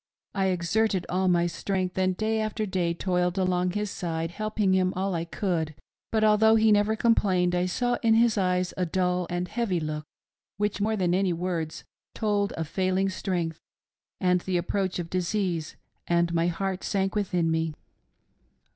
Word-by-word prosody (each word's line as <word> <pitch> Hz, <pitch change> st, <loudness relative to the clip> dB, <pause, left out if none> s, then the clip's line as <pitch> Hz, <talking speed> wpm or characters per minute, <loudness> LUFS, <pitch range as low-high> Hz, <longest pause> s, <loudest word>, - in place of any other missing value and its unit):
I 195 Hz, -1 st, +1 dB
exerted 190 Hz, +2 st, +1 dB
all 185 Hz, +1 st, +1 dB
my 175 Hz, -1 st, +3 dB
strength, 185 Hz, +1 st, -2 dB
and 185 Hz, -1 st, +1 dB
day 220 Hz, 0 st, 0 dB
after 215 Hz, 0 st, -2 dB
day 185 Hz, -3 st, 0 dB
toiled 180 Hz, 0 st, 0 dB
along 180 Hz, -1 st, +1 dB
at 180 Hz, -, -6 dB
his 210 Hz, -1 st, -1 dB
side, 165 Hz, -1 st, -3 dB
helping 215 Hz, -1 st, 0 dB
him 185 Hz, -1 st, +2 dB
all 190 Hz, +1 st, -1 dB
I 165 Hz, -1 st, -2 dB
could;, 165 Hz, -4 st, -2 dB, 0.4 s
but 220 Hz, -1 st, +2 dB
although 215 Hz, +1 st, +5 dB
he 220 Hz, 0 st, +4 dB
never 210 Hz, +1 st, +3 dB
complained, 190 Hz, -6 st, +2 dB
I 180 Hz, 0 st, +1 dB
saw 245 Hz, +6 st, 0 dB
in 225 Hz, -1 st, +4 dB
his 230 Hz, -1 st, +4 dB
eyes 180 Hz, -2 st, 0 dB
a 185 Hz, -, +1 dB
dull 180 Hz, 0 st, 0 dB
and 175 Hz, 0 st, -2 dB
heavy 205 Hz, -5 st, -1 dB
look 155 Hz, -1 st, -4 dB, 0.5 s
which, 205 Hz, 0 st, -1 dB
more 220 Hz, +2 st, +1 dB
than 180 Hz, -4 st, +1 dB
any 185 Hz, -1 st, +2 dB
words, 170 Hz, -2 st, -3 dB, 0.3 s
told 205 Hz, -2 st, 0 dB
of 160 Hz, -1 st, -4 dB
failing 185 Hz, +3 st, 0 dB
strength 175 Hz, -4 st, -2 dB, 0.6 s
and 180 Hz, -1 st, +2 dB
the 185 Hz, -1 st, -1 dB
approach 185 Hz, +2 st, -1 dB
of 175 Hz, -2 st, -3 dB
disease, 180 Hz, -3 st, -1 dB, 0.3 s
and 170 Hz, 0 st, +2 dB
my 165 Hz, 0 st, +2 dB
heart 190 Hz, +2 st, -2 dB
sank 195 Hz, -1 st, 0 dB
within 180 Hz, -5 st, 0 dB
me. 160 Hz, -1 st, -1 dB
185 Hz, 175 wpm, -27 LUFS, 175-205 Hz, 0.6 s, although